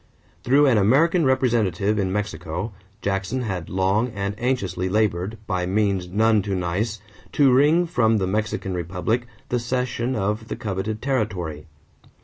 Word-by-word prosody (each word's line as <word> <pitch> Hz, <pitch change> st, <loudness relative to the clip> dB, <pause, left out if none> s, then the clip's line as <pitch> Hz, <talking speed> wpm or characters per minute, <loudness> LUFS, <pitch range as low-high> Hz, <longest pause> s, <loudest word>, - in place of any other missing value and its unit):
Through 140 Hz, +4 st, +4 dB
an 125 Hz, -6 st, +4 dB
American 155 Hz, -, +4 dB
representative 110 Hz, -6 st, +1 dB
in 95 Hz, -2 st, 0 dB
Mexico, 95 Hz, 0 st, -3 dB, 0.3 s
Jackson 100 Hz, +6 st, -1 dB
had 95 Hz, -7 st, -4 dB
long 95 Hz, +5 st, +1 dB
and 100 Hz, 0 st, -2 dB
anxiously 95 Hz, -8 st, -1 dB
labored, 105 Hz, 0 st, 0 dB
by 90 Hz, -3 st, -1 dB
means 100 Hz, -2 st, 0 dB
none 110 Hz, +2 st, +3 dB
too 100 Hz, 0 st, -2 dB
nice, 95 Hz, +5 st, -2 dB, 0.3 s
to 140 Hz, -3 st, +5 dB
wring 150 Hz, +7 st, +4 dB
from 115 Hz, -9 st, +2 dB
the 95 Hz, -, 0 dB
Mexican 105 Hz, 0 st, -2 dB
republic 90 Hz, +8 st, -2 dB, 0.2 s
the 125 Hz, -, +1 dB
cession 125 Hz, +1 st, -2 dB
of 105 Hz, +2 st, -2 dB
the -, -, -4 dB
coveted 105 Hz, +1 st, -4 dB
territory. 95 Hz, -, -2 dB
105 Hz, 140 wpm, -23 LUFS, 95-120 Hz, 0.3 s, to